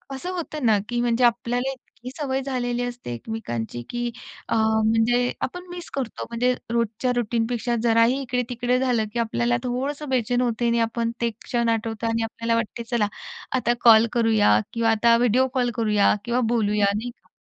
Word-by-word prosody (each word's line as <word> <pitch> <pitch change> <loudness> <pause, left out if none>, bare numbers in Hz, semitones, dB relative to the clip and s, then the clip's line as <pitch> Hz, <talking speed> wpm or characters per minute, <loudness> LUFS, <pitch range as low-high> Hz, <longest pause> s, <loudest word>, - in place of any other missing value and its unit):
असं 310 +7 -6
होतं 310 -6 -4
ना 220 -2 +5
की 240 0 -1
म्हणजे 240 0 +1
आपल्याला 245 +2 +1
इतकी 255 -1 -11
सवय 270 -3 -1
झालेली 245 -2 -2
असते 245 - -5
एकमेकांची, 120 - -5
की 240 0 -2 0.4
अ, - - 0
म्हणजे 225 +2 +2
आपण 360 +7 -4
मिस 350 -1 -8
करतो. 260 -5 -4
म्हणजे 245 +2 +1 0.2
रोजच्या 235 +1 0
रुटीनपेक्षा 235 +1 -1
जराही 230 +3 +3
इकडे-तिकडे 250 -1 -1
झालं, 245 -4 +1
की 235 - -2
आपल्याला 120 - +1
थोडंसं 275 +4 -3
बेचैन 245 -1 +1
होते 240 -1 0
आणि 235 0 +2
आपण 230 0 0
ते 235 - +2
क्षण 235 -2 0
आठवतो 225 0 -2
आणि 225 0 0
आपल्याला 230 +1 -1
वाटते 230 0 -3
चला. 230 -4 +2 0.5
आता 245 -2 +2
कॉल 230 -1 +7
करूया 220 - +4
किंवा 230 -1 +1
आता 230 +1 +4
व्हिडिओ 245 +2 +3
कॉल 250 -2 +1
करूया 215 -3 +3
किंवा 240 +1 0
बोलूया, 210 -3 +2
नाही 225 +4 -3
का? - - -32
235 Hz, 170 wpm, -24 LUFS, 225-250 Hz, 0.5 s, कॉल